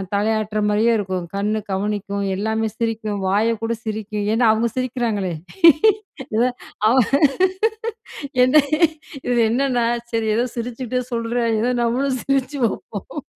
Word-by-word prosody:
தலையாட்டுற 215 0 0
மாரியே 220 +3 +3
இருக்கும், 185 -3 -3
கண் 205 +2 0 0.2
கவனிக்கும், 200 0 -2
எல்லாமே 220 +2 -1
சிரிக்கும். 225 -3 -2
வாய 210 +4 +2
கூட 230 +1 0
சிரிக்கும். 215 -1 -3
ஏனா, 235 +1 +3
அவுங்க 225 +2 +1
சிரிக்கிறாங்களே! 235 -7 -1 1.0
இத 230 - +3 0.4
அவ 240 - +4 1.5
என்ன 255 +3 +2 0.7
இது 245 -1 +1
என்னன்னா, 250 -2 +1 0.3
சரி 225 -1 0
ஏதோ 240 +2 +2
சிரிச்சிட்டே 250 +1 -3
சொல்றேன், 230 0 0
ஏதோ 245 +2 +1
நம்மளும் 255 +3 0
சிரிச்சு 275 +1 0
வப்போம். 215 +8 -6
225 Hz, 115 wpm, -21 LUFS, 210-245 Hz, 1.5 s, அவ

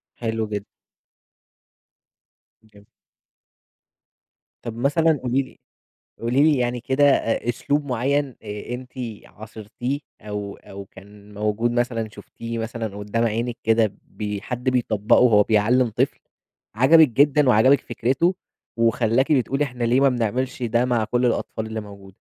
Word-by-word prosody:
حلو 115 -1 -2
جدًا. 105 -1 -4 2.0
جم 100 -1 -20 1.8
طَب 115 -1 -6
مثلًا 150 +4 +2
قولي 125 +2 +1
لي 130 - -12 0.6
قولي 120 +5 +2
لي 155 -2 +4
يعني 125 0 -1
كده 135 +4 +1
أ 120 -4 +2
أسلوب 145 +5 -1
معيّن 135 +1 -1
آآ 105 +2 -6
أنتِ 125 0 -8 0.3
عاصِرتيه 110 +5 -6 0.2
أو 105 -1 -5
أو 100 0 -11
كان 100 +2 -16
موجود 105 +3 -1
مثلًا 120 -2 -1
شُفتيه 115 +2 -8
مثلًا 115 -2 -5
قُدّام 105 +3 -2
عينِك 115 +2 -2
كده 110 -2 +2
بي 105 -2 -5
حد 125 +4 -2
بيطبَّقه 115 -4 +2
وهو 110 -5 +5
بيعلِّم 115 +4 +2
طفل 110 - -1 0.6
عجبِك 150 +6 +6
جدًا 140 +3 +3
وعجبِك 130 +4 +5
فكرته 135 +10 0 0.4
وخلّاكِ 115 +3 +2
بتقولي 135 0 +2
إحنا 125 -4 -4
ليه 120 +2 +3
ما 140 - +5
بنعملش 125 +2 -2
ده 120 +1 +1
مع 120 -3 +1
كل 120 +3 0
الأطفال 115 -2 -1
اللي 110 0 -5
موجوده؟ 100 -2 -13
120 Hz, 130 wpm, -22 LUFS, 110-130 Hz, 2.0 s, عجبِك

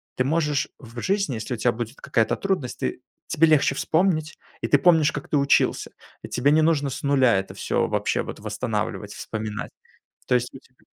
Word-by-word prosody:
ты 130 - +1
можешь 150 -1 +1
в 120 -2 -10
жизни, 195 - 0
если 110 +3 -4
у - - -3
тебя 120 +2 +2
будет 120 +2 -5
какая-то 120 -5 +1
трудность, 190 -11 -2
ты 65 - -3 0.3
тебе 165 - +3
легче 150 -3 +3
вспомнить, 155 -1 0 0.2
и - - -1
ты 145 - +5
помнишь, 160 -1 +4
как 145 - -6
ты 150 - +2
учился. 140 0 +2 0.3
И - - -6
тебе 140 +3 +1
не 155 +1 +5
нужно 155 -3 +2
с 130 - -6
0 130 -6 +4
это 95 0 -4
всё - - -1
вообще - - 0
вот - - -8
восстанавливать, - - -3
вспоминать, 105 -1 -5 0.6
то 125 - +3
есть 125 0 0
у 135 - -10
тебя 125 0 -29
140 Hz, 195 wpm, -24 LUFS, 120-155 Hz, 0.6 s, ты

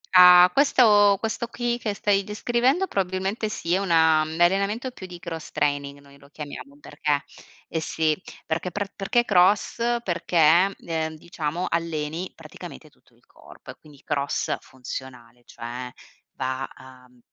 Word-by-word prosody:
Ah, 180 0 +9
questo 210 -8 +5
questo 225 +2 -3
qui 240 0 -2
che 210 -3 -3
stai 200 -1 +1
descrivendo, 240 - +1
probabilmente 195 - -2
sì, 170 -4 -3
è 190 - +3
una 160 -4 +4
un 155 +1 -4
allenamento 200 +8 +1
più 190 -6 -10
di 180 -1 -9
Cross 165 -2 -7
Training, 145 -1 -1
noi 140 0 -19
lo 140 +1 -19
chiamiamo 145 -1 -9
perché 145 0 -2 0.4
eh 160 - -3
sì, 155 -1 0 0.3
perché 170 +3 -2
pr 200 +1 -4
perché, 240 +5 +1
cross? 195 0 +3 0.3
Perché, 175 0 +3
ehm, 160 -1 -2
diciamo 165 +1 -4
alleni 165 +1 -3
praticamente 65 - -11
tutto - - -30
il - - -31
corpo - - -14
e - - -14
quindi 145 -3 -18
cross 140 -1 -1
funzionale, 125 -2 -10
cioè 125 +2 -7 0.4
va 130 0 -3
a 130 -1 -16
mhmm, 125 0 -25
170 Hz, 150 wpm, -24 LUFS, 145-200 Hz, 0.4 s, Ah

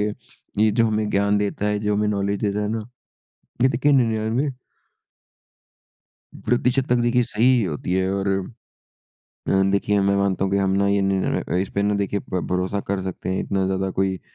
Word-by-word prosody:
कि 105 - +1 0.6
ये 110 - +4
जो 115 +2 +2
हमें 110 -1 0
ज्ञान 100 0 +2
देता 105 0 -2
है, 105 0 0
जो 105 0 0
हमें 105 0 +1
नॉलेज 100 -1 -1
देता 105 0 0
है 105 - -1
ना, 110 0 -4 0.7
ये 130 - +6
देखिए 130 +4 +2
99 115 +2 +1 1.9
प्रतिशत 125 +2 +1
तक 125 - +3
देखिए 120 +1 +2
सही 115 -1 -1
ही 125 -2 +5
होती 85 +1 -3
है 95 0 +1
और 100 0 -1 1.2
अ, - - +1 0.2
देखिए 100 +1 +1
मैं 100 0 +2
मानता 100 -1 0
हूँ 95 - -2
कि 100 - +2
हम 95 -1 +1
ना 100 0 +2
ये 100 0 +2
निर 95 -1 0
अ, - - 0
इस 95 +1 0
पे 100 - +2
ना 105 0 +1
देखिए 100 0 -1
प 95 -1 -4
भरोसा 90 +2 -1
कर 100 -1 -1
सकते 95 0 -5
हैं 95 - -1
इतना 95 -1 -1
ज़्यादा 95 0 -1
कोई 95 0 -1
100 Hz, 195 wpm, -22 LUFS, 95-110 Hz, 1.9 s, ये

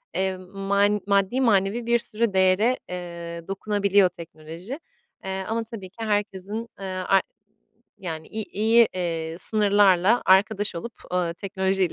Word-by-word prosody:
eee, 190 0 0
man 200 +2 0
maddi 200 +5 +2
manevi 215 0 +2
bir 235 0 +3
sürü 230 -2 -1
değere, 190 +6 +3
eee, 170 -2 -7
dokunabiliyor 200 -1 +2
teknoloji. 170 - -9 0.5
Eee, 190 0 -3
ama 225 +1 -1
tabii 220 -4 -9
ki 225 +4 -7
herkesin, 205 +1 -2
eee, 195 - -6
ar 185 0 +1 0.8
yani 160 -4 -6
i 220 0 -4
iyi, 225 +3 +4
eee, 165 -2 -3
sınırlarla 205 0 +4
arkadaş 200 +1 +3
olup, 235 +8 -6 0.2
ııı, 175 -2 0
teknolojiyle 190 0 0
195 Hz, 130 wpm, -24 LUFS, 185-215 Hz, 0.8 s, iyi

